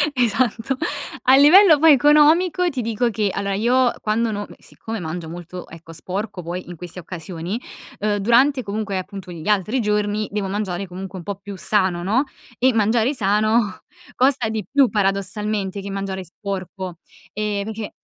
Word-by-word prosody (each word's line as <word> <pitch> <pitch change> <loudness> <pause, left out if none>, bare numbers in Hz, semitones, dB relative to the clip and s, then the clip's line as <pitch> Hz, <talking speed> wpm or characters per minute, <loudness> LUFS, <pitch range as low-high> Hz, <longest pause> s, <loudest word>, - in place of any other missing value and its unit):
Esatto. 245 +1 0 0.5
A 260 - +6
livello 315 +2 +7
poi 320 -1 +7
economico 305 +6 +4
ti 265 -6 -3
dico 230 +1 0
che 210 -2 0
allora, 200 0 -2
io 245 +4 +3
quando 220 +2 0
non 205 0 -3
m - - -11
siccome 225 0 -7
mangio 165 0 -5
molto, 175 +1 -8
ecco, 165 0 -12
sporco 190 +1 -5
poi 175 +2 -6
in 175 - -7
queste 180 +2 -8
occasioni, 175 +4 -6 0.4
uhm, 205 0 0
durante 250 +6 +3
comunque 205 -1 -3
appunto 185 -1 -7
gli 165 0 -8
altri 210 +4 +1
giorni 210 0 0
devo 205 -2 -2
mangiare 195 -2 -3
comunque 190 +1 -7
un 170 - -9
po' 200 - -3
più 200 0 -9
sano, 185 -5 +1
no, 225 +9 +2 0.4
e 260 +1 +4
mangiare 225 +4 +2
sano 215 -2 +1 0.4
costa 260 -2 +2
di 220 -1 -3
più 275 -3 +4
paradossalmente 200 0 -1
che 200 - -7
mangiare 195 -1 -4
sporco, 185 -1 -6 0.4
ehm, 210 -1 -2
perché 220 -1 -5
205 Hz, 165 wpm, -21 LUFS, 190-235 Hz, 0.5 s, livello